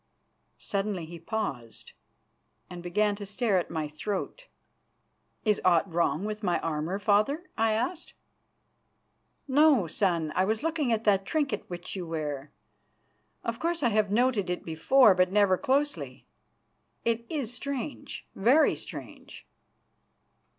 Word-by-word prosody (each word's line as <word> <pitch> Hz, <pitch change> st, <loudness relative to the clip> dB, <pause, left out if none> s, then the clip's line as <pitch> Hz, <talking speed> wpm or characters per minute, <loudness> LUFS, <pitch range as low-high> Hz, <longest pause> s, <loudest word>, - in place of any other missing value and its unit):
Suddenly 195 Hz, -4 st, -2 dB
he 170 Hz, +1 st, -9 dB
paused, 160 Hz, -, -4 dB, 0.8 s
and 175 Hz, -1 st, -7 dB
began 205 Hz, +4 st, +1 dB
to 205 Hz, -, -7 dB
stare 205 Hz, -1 st, +1 dB
at 175 Hz, -, -4 dB
my 160 Hz, -2 st, -2 dB
throat. 205 Hz, -, -5 dB, 1.0 s
"Is 210 Hz, -2 st, +2 dB
aught 175 Hz, 0 st, +3 dB
wrong 170 Hz, +2 st, +1 dB
with 215 Hz, 0 st, -4 dB
my 180 Hz, -5 st, +1 dB
armour, 160 Hz, +3 st, -2 dB
Father?" 215 Hz, +10 st, +2 dB
I 225 Hz, 0 st, +2 dB
asked. 255 Hz, +10 st, -2 dB, 1.3 s
"No, 280 Hz, -, +5 dB
son. 165 Hz, -2 st, 0 dB
I 185 Hz, -, +3 dB
was 220 Hz, +5 st, -1 dB
looking 320 Hz, -6 st, 0 dB
at 225 Hz, -1 st, +1 dB
that 195 Hz, -3 st, +3 dB
trinket 280 Hz, -9 st, -1 dB
which 175 Hz, +1 st, -6 dB
you 180 Hz, -3 st, -5 dB
wear. 150 Hz, -3 st, -4 dB, 0.9 s
Of 230 Hz, +1 st, -3 dB
course 335 Hz, 0 st, -1 dB
I 240 Hz, -, +4 dB
have 215 Hz, -2 st, +2 dB
noted 225 Hz, -3 st, +2 dB
it 180 Hz, -, -3 dB
before, 195 Hz, +8 st, +5 dB
but 180 Hz, 0 st, +2 dB
never 200 Hz, -2 st, +4 dB
closely. 285 Hz, +4 st, -1 dB, 0.8 s
It 230 Hz, 0 st, +1 dB
is 270 Hz, -7 st, -2 dB
strange, 275 Hz, +2 st, -5 dB
very 255 Hz, +10 st, +4 dB
strange!" -, -, -10 dB
205 Hz, 130 wpm, -28 LUFS, 175-245 Hz, 1.3 s, No